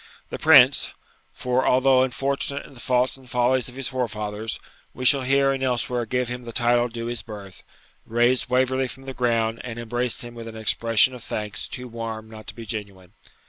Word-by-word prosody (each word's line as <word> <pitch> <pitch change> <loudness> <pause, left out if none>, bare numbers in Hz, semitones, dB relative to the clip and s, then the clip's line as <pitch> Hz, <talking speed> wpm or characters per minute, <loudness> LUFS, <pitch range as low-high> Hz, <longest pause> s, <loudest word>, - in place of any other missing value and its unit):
The - - -6
Prince 140 -4 +6 0.4
(for, 125 +1 0
although 130 0 +4
unfortunate 140 +2 -1
in - - -14
the 125 - -14
faults 125 +2 +1
and 130 -2 -17
follies 125 0 +1
of 125 - -13
his 135 -1 -3
forefathers, 110 -4 -3 0.4
we 130 - -5
shall 140 +1 +6
here 135 +1 +3
and 135 -1 -2
elsewhere 125 -2 -1
give 125 +1 0
him 125 +1 -5
the 120 -1 -8
title 120 0 +2
due 115 0 -7
to - - -4
his 120 -1 -2
birth) 100 -4 -10 0.5
raised 120 +2 +2
Waverley 130 +1 +2
from 130 +2 -9
the 135 0 -6
ground 115 -2 0
and 120 -2 -6
embraced 120 +2 -1
him 120 0 -9
with 115 -1 -8
an 110 -1 -8
expression 115 +3 +3
of 125 -2 -10
thanks 105 -1 -3
too 125 -1 -7
warm 115 -2 -6
not 110 -1 -11
to 105 - -8
be 115 0 -8
genuine. 100 -4 -6
120 Hz, 200 wpm, -24 LUFS, 115-130 Hz, 0.5 s, Prince